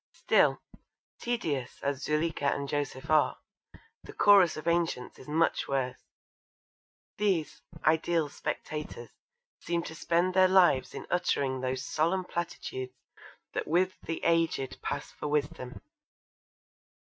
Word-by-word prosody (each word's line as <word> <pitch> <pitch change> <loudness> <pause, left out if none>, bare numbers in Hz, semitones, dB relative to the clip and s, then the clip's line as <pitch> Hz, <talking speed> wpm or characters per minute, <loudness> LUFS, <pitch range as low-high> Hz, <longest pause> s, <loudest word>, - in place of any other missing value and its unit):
Still, - - +3 0.6
tedious 155 - -2
as 140 -1 -1
Zuleekha 150 -2 0
and 140 0 -4
Joseph 145 -1 -3
are, 155 -1 +4 0.6
the - - -11
Chorus 195 -6 +6
of 155 - -7
Ancients 170 -7 0
is - - -13
much 160 +3 +1
worse. 130 -2 -1 1.2
These 185 -8 0 0.2
'ideal 160 0 +2
spectators' 150 -4 -5 0.5
seem 170 0 -2
to 160 - -7
spend 170 +3 +1
their 185 0 +6
lives 180 -9 +4
in - - -6
uttering 140 -7 0
those 130 +1 -2
solemn 170 +6 0
platitudes 130 -7 -5 0.6
that - - -2
with 180 +4 +2
the 165 - -5
aged 165 -5 +1
pass 140 - -4
for - - -6
wisdom. 145 -4 -2
155 Hz, 120 wpm, -29 LUFS, 140-170 Hz, 1.2 s, Chorus